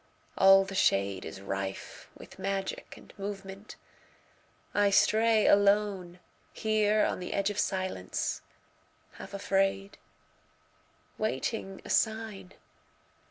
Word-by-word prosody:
All 195 0 +6
the 195 - -8
shadeIs 100 - 0
rife 95 0 -5
with - - -14
magic 195 0 -4
and - - -16
movement. 195 0 -7 1.0
I 205 -1 +3
stray 220 +2 +4
aloneHere 205 +2 +1
on - - -3
the 180 - -5
edge 200 +1 0
of 205 - -4
silence, 185 - -2 0.8
half - - -9
afraid, 195 0 0 1.2
Waiting 215 -2 -3
a - - -5
sign. 220 -4 -1
195 Hz, 95 wpm, -29 LUFS, 190-210 Hz, 1.2 s, All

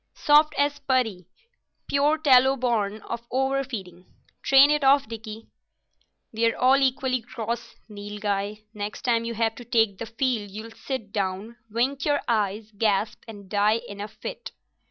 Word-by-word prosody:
"Soft 300 +1 +4
as 285 0 +1
putty—pure 280 - -2
tallow 265 -3 +5
born 220 -5 -1
of 235 0 -6
over 270 +1 0
feeding. 185 -8 -8 0.3
Train 275 +2 +6
it 300 -1 +1
off, 275 -2 +4
Dickie." 220 0 -8 0.9
"We're 230 +1 +1
all 260 +2 +5
equally 260 -1 +1
gross, 235 0 -5
Nilghai. 205 0 -4
Next 210 -1 -6
time 230 -3 +1
you 230 0 -4
have 225 0 +1
to 245 - -11
take 225 -5 +1
the 230 - -5
field 225 -3 -1
you'll 215 +3 -8
sit 225 -3 -6
down, 200 +3 -3
wink 260 +5 -1
your 290 -1 +1
eyes, 215 -1 -1
gasp, 210 0 0
and 205 -3 -11
die 210 +3 +2
in 200 0 -8
a 205 - -4
fit." 485 - -8
230 Hz, 150 wpm, -25 LUFS, 210-270 Hz, 0.9 s, Train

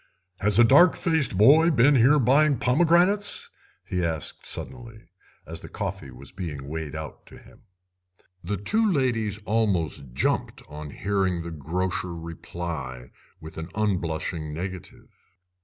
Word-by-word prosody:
"Has 105 0 +3
a 120 - +8
dark 145 +9 +6
faced 160 - 0
boy 150 - +6
been 140 -1 +4
here 135 +3 +5
buying 140 +2 +3
pomegranates?" 175 - +2 0.3
he 90 -1 -2
asked 80 -3 -2
suddenly, 115 -5 -5 0.4
as - - -6
the - - -11
coffee 70 - -5
was 65 +2 -11
being 80 -7 -6
weighed 80 0 -5
out 80 -1 -8
to - - -13
him. - - -19 0.8
The 100 +4 -2
two 215 - +1
ladies 120 - 0
almost 90 - -1
jumped - - -1
on 75 0 -8
hearing 95 0 -1
the 85 - -7
grocer 85 +3 -3
reply 80 -6 -7 0.3
with 80 +1 -9
an 80 +2 -6
unblushing 85 -6 -2
negative. 90 +3 -8
95 Hz, 135 wpm, -25 LUFS, 80-125 Hz, 0.8 s, a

